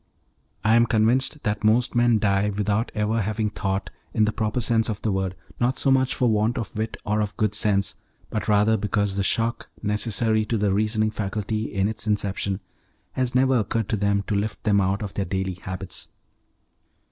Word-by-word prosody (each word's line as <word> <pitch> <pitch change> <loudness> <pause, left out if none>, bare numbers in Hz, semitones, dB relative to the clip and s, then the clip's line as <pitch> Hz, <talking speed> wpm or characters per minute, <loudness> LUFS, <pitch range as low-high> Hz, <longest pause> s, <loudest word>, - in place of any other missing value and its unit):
I 110 +2 +4
am 115 0 +5
convinced 125 +7 +2
that 105 -1 -1
most 115 +3 +3
men 120 -1 +4
die 100 -1 +2
without 105 +2 -1
ever 105 +2 +1
having 110 +1 -1
thought, 95 -1 -2 0.2
in 110 - +4
the 110 - +1
proper 110 +2 -1
sense 115 -1 +1
of 105 - -3
the 110 - +1
word, 95 -1 -1 0.2
not 125 +2 +1
so 135 - +1
much 130 -1 +2
for 125 - +2
want 110 +3 +1
of 115 -4 -5
wit 110 +1 -3
or 105 0 +1
of 105 0 -3
good 105 -2 +1
sense, 105 -2 +1 0.3
but 110 - -2
rather 105 +1 +4
because 100 -1 0
the 100 - 0
shock 115 +4 0
necessary 110 +1 +1
to 115 +1 -1
the 100 -2 +1
reasoning 110 +1 +1
faculty 105 +1 -3
in 95 0 +1
its 110 0 -3
inception 100 -1 -1 0.5
has 125 -1 -2
never 130 0 +4
occurred 110 0 -1
to - - +1
them 100 -1 +1
to - - -2
lift 105 +1 -2
them 100 -2 +3
out 95 +2 0
of 100 - -5
their 100 - -1
daily 95 +1 -2
habits. 95 -1 -6
105 Hz, 195 wpm, -24 LUFS, 100-115 Hz, 0.5 s, am